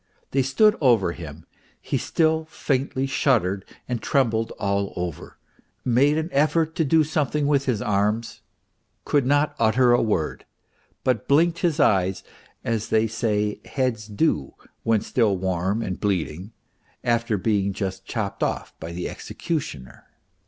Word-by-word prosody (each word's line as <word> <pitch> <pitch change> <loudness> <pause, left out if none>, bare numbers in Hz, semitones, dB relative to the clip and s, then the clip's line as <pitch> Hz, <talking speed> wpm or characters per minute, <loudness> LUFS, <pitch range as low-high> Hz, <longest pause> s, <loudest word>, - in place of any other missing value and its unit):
They 135 - +2
stood 210 - +4
over 115 - +4
him, 80 -2 -9 0.3
he - - -2
still 160 -1 +1
faintly 135 -3 -1
shuddered 110 -8 +1 0.2
and 125 -2 -2
trembled 115 -5 +1
all 100 -1 -1
over, 90 -4 -5 0.5
made 135 +5 +3
an 160 +1 -2
effort 155 +3 +2
to 165 - +3
do 160 +2 +4
something 150 -1 0
with 140 -1 +2
his 115 -6 0
arms, 105 +3 0 0.6
could 140 -4 +2
not 145 +2 +2
utter 120 +2 +4
a 120 - +4
word, 105 -9 -1 0.6
but 125 -5 0
blinked 165 +4 +3
his 170 -3 0
eyes 95 -7 +2 0.4
as 115 -2 -2
they 110 0 +3
say 105 -2 -1
heads 125 -5 -2
do 100 - 0 0.3
when 115 -2 +2
still 110 -6 +1
warm 95 +4 -1
and 95 -4 -4
bleeding, 95 -1 -2 0.5
after 115 -3 +1
being 100 0 +1
just 95 -1 -4
chopped 100 -1 -4
off - - -2
by 80 - -6
the 90 +1 -3
executioner. 75 - -5
115 Hz, 140 wpm, -24 LUFS, 100-140 Hz, 0.6 s, stood